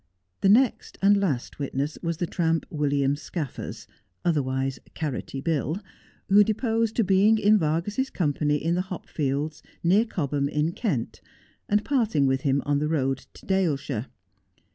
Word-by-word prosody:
The 195 - +3
next 245 +4 +3
and 200 +1 +6
last 145 -12 -2
witness 140 +1 -2
was 165 -1 -2
the 175 - -1
tramp, 165 -3 0
William 140 -2 +1
Scaffers, 150 -1 -6 0.4
otherwise 135 -5 0 0.2
CaiTotty 140 -2 -4
Bill, 160 +2 0 0.5
who 205 +2 +7
deposed 225 +1 0
to 230 - +3
being 200 +3 +4
in 215 0 +4
Vargas's 175 - 0
com 150 -6 0
pany 150 0 +1
in 165 +4 0
the 180 - +1
hopfielcls, 150 -3 -3 0.2
near 195 +7 +4
Cobham, 145 - -1
in 150 +2 0
Kent, 175 - -2 0.5
and 210 +1 +2
parting 225 - +2
with 135 0 +1
him 140 0 +1
on 145 0 +1
the 150 - 0
road 135 -4 -1
to - - -14
Daleshire. 145 - 0
160 Hz, 150 wpm, -26 LUFS, 140-195 Hz, 0.5 s, who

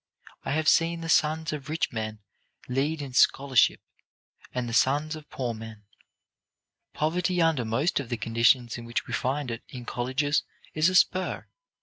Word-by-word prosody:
I - - -2
have 155 +1 0
seen 165 0 +3
the 165 - -5
sons 155 0 +2
of 145 -1 -6
rich 160 +2 -1
men 110 -1 -5 0.5
lead 145 +4 -1
in 135 -2 -8
scholarship, 135 -1 +4 0.7
and 125 -1 -3
the 115 - -5
sons 145 +5 +2
of 155 -1 -12
poor 125 -3 -3
men. 110 -1 -10 1.1
Poverty 175 +3 0
under 165 -6 +2
most 130 +11 0
of 135 -4 -6
the 120 - -2
conditions 115 +2 +2
in 120 - -9
which 120 +1 -2
we - - -7
find 130 0 -1
it 115 - -5
in 125 -2 -8
colleges 130 +5 0 0.3
is 155 +3 +3
a 185 - -2
spur. 185 0 +2
140 Hz, 165 wpm, -27 LUFS, 120-155 Hz, 1.1 s, scholarship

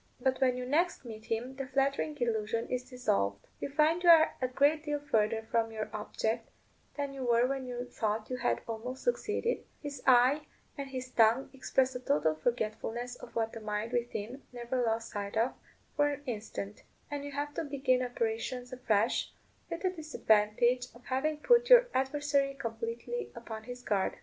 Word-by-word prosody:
But 260 +1 0
when 255 -1 +3
you 250 - -3
next 315 +3 +1
meet 220 -2 -8
him 240 +4 -3
the 270 -1 -4
flattering 275 +3 0
illusion 230 -1 0
is 250 0 -3
dissolved: 100 - 0
you - - -3
find 310 +4 +3
you 350 - +4
are 320 -1 +8
a 255 - +2
great 285 +4 +3
deal 295 -1 -1
further 220 -5 +1
from 225 -1 +2
your 215 -1 -4
object 220 +2 -2 0.5
than 285 -1 -2
you 270 -1 -5
were 240 0 +4
when 265 0 -2
you 245 0 -4
thought 215 -2 -2
you 255 - -1
had - - 0
almost 240 +3 -5
succeeded; 475 -1 0 0.2
his 285 -3 -6
eye 260 +4 +5 0.3
and 280 -2 -5
his 255 -1 -5
tongue 230 +3 +4
express 265 0 +1
a 250 - -4
total 155 - +2
forgetfulness 235 +5 -2
of 235 - -12
what 225 -1 0
the 225 - -6
mind 215 +1 -3
within 240 +1 -3
never 245 +1 -2
lost 225 -1 0
sight 205 0 -4
of 230 +3 +2 0.4
for 290 -1 +4
an 285 0 -5
instant; 210 -4 -5 0.3
and 290 -1 -3
you 285 - -6
have 290 +1 -3
to - - -2
begin 275 -3 +1
operations 245 +1 -2
afresh, 230 -3 +1 0.4
with 335 - -4
the 370 - +2
disadvantage 245 - +2
of 245 - -16
having 295 +4 0
put 480 +9 +4
your - - +8
adversary 275 +1 +1
completely 230 - -4
upon 225 -2 -7
his 245 0 -8
guard. 200 -4 0
250 Hz, 180 wpm, -31 LUFS, 225-280 Hz, 0.5 s, are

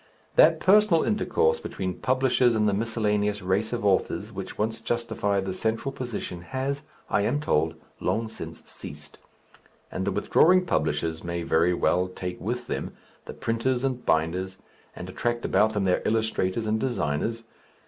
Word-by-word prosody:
That - - +6
personal 195 -4 +5
intercourse 460 - +1
between 95 -2 -4
publishers 130 -2 +3
and 105 -1 +2
the 100 - +2
miscellaneous 105 -1 0
race 95 +4 0
of 120 -3 -2
authors 95 -2 +1
which - - -6
once 110 +1 -1
justified 110 -4 -1
the 95 - -2
central 115 +7 -1
position 120 -9 -5
has, 135 +8 -3 0.3
I 105 - +1
am 120 +8 +1
told, 80 - +1 0.2
long 115 0 0
since 80 -7 -9
ceased. - - -10 0.7
And 95 - -3
the 100 - 0
withdrawing 180 - +4
publishers 80 - -1
may 85 0 -3
very 85 +2 +3
well 90 +1 +2
take 90 -1 -6
with 120 +6 -3
them - - -4 0.3
the - - -7
printers 120 +3 -1
and 130 -2 -1
binders, 85 +4 0 0.4
and - - -7
attract 120 0 -2
about 105 +3 +3
them 105 -2 0
their 90 -1 +2
illustrators 110 -1 0
and 110 0 +1
designers.... 115 - -1
110 Hz, 155 wpm, -26 LUFS, 95-120 Hz, 0.7 s, That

